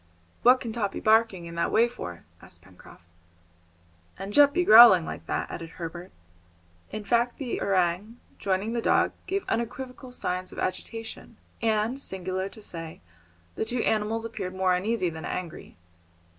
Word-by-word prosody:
"What 250 +2 +6
can 230 - -5
Top 205 -4 -2
be - - -4
barking 220 -5 +3
in 170 - -8
that 170 - -1
way 230 +2 +4
for?" 90 - -8 0.2
asked - - -13
Pencroft. - - -17 1.1
"And 195 +2 -6
Jup 285 +2 +7
be 355 +3 +1
growling 220 - +9
like - - -7
that?" - - -2
added 165 -1 -7
Herbert. 175 +1 -7 0.8
In 215 0 -6
fact 240 +3 +1
the 260 -4 -4
orang, 195 +4 0 0.2
joining 195 +3 -1
the 235 - -1
dog, - - +3 0.2
gave 390 0 -2
unequivocal 250 +2 -4
signs 185 -6 -3
of - - -12
agitation, 225 +4 -5 0.2
and, 225 +4 0
singular 190 -2 -3
to 215 +1 -13
say, 165 -4 -7 0.5
the - - -2
two 240 +1 -1
animals 220 +1 0
appeared 195 -5 -5
more 185 -1 +2
uneasy 185 -1 0
than 160 0 -8
angry. 175 - -6
215 Hz, 155 wpm, -27 LUFS, 185-235 Hz, 1.1 s, growling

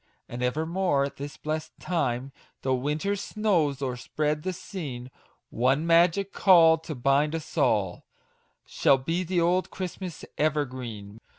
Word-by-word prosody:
And 120 +1 -6
evermore 160 +4 +1
at 140 - -4
this 140 +1 -7
blest 155 0 -4
time, 135 -6 -1 0.3
Tho' 130 - +1
winter's 150 +10 -1
snows 170 -12 0
overspread 150 +4 -2
the 185 - -2
scene, 140 -9 -7 0.4
One 135 +6 +1
magic 170 +3 +3
call, 165 -4 +6
to 160 -1 -7
bind 140 +5 +2
us 160 - -7
all, 95 -5 +1 0.6
Shall 135 - +3
be 175 +6 -1
old 175 +2 +2
Christmas' 185 -2 -6
evergreen 125 -9 -2
150 Hz, 125 wpm, -27 LUFS, 130-175 Hz, 0.6 s, call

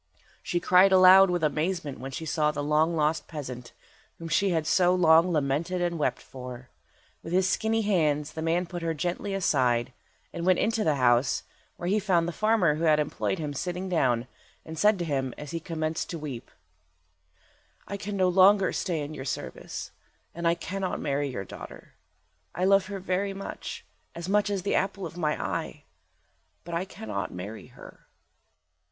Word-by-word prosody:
She 175 - -1
cried 185 +2 +5
aloud 190 +1 +8
with 175 -2 -1
amazement 155 0 -1
when 135 - -6
she 150 +4 -6
saw 150 -1 +1
the 145 -1 -3
long 155 +3 +2
lost 155 0 0
peasant, 125 -6 -7 0.5
whom 165 0 -7
she 195 +4 +2
had 165 -3 0
so 180 +2 +3
long 165 0 +5
lamented 155 +4 0
and 175 -2 -1
wept 130 -4 -1
for. 125 -1 -9 0.5
With 165 - -7
his 185 0 +3
skinny 220 +3 +1
hands 155 -7 +1
the 160 - -5
man 165 +3 +1
put 175 0 -6
her 165 -1 -1
gently 180 +5 -2
aside, 125 -9 +1 0.4
and 170 - -4
went 185 0 +4
into 225 0 +1
the 155 -5 +2
house, 125 0 +2 0.3
where 175 - -5
he 205 +3 +2
found 180 -4 +1
the - - -2
farmer 215 -5 +2
who 160 +3 -2
had 155 -1 +4
employed 150 +5 -1
him 150 -3 -4
sitting 180 +5 -4
down, 125 -9 +1 0.4
and 160 - -7
said 210 0 +4
to 175 - -3
him, 135 -4 -2
as 150 -1 -8
he 165 - -3
commenced 160 -1 -3
to 170 - -4
weep— 140 -6 -7 1.4
"I 200 - -4
can 200 0 -5
no 185 -1 +3
longer 190 +2 +5
stay 170 -5 -2
in 145 +1 -5
your 135 -3 -7
service, 65 - -5 0.4
and 170 0 -2
I 170 - +3
cannot 185 +2 -4
marry 145 0 -1
your 110 -7 -5
daughter. - - -11 0.6
I 180 - 0
love 195 0 +4
her 200 -1 -5
very 190 +1 -2
much, 195 - -7 0.3
as 170 +1 -6
much 205 +1 +2
as 195 -3 -2
the 200 - 0
apple 195 0 -1
of 165 - -8
my 155 -3 -1
eye, - - -4 0.8
but 170 - -8
I 170 +3 -1
cannot 105 - -5
marry 100 +5 -8
her." - - -15
170 Hz, 185 wpm, -27 LUFS, 150-185 Hz, 1.4 s, aloud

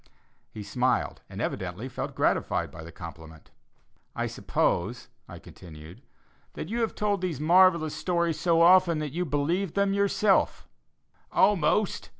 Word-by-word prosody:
He 105 - -8
smiled, 125 +5 -1
and - - -9
evidently - - -4
felt - - -6
gratified - - 0
by 80 - -10
the 85 - -10
compliment. 80 -2 -11 0.6
"I - - -2
suppose," - - -2 0.2
I - - -9
continued, 80 -1 -13 0.5
"that 160 - -7
you 235 +2 -2
have 225 - -1
told 205 -2 -1
these 175 -7 -3
marvellous 170 -1 +4
stories 170 0 -1
so 165 -1 +3
often, 180 -1 +5
that 150 -2 -4
you 180 +2 -2
believe 160 +5 -1
them 200 0 +1
yourself?" 200 0 +1 0.6
"Almost!" 200 +1 +2
165 Hz, 140 wpm, -27 LUFS, 130-185 Hz, 0.6 s, often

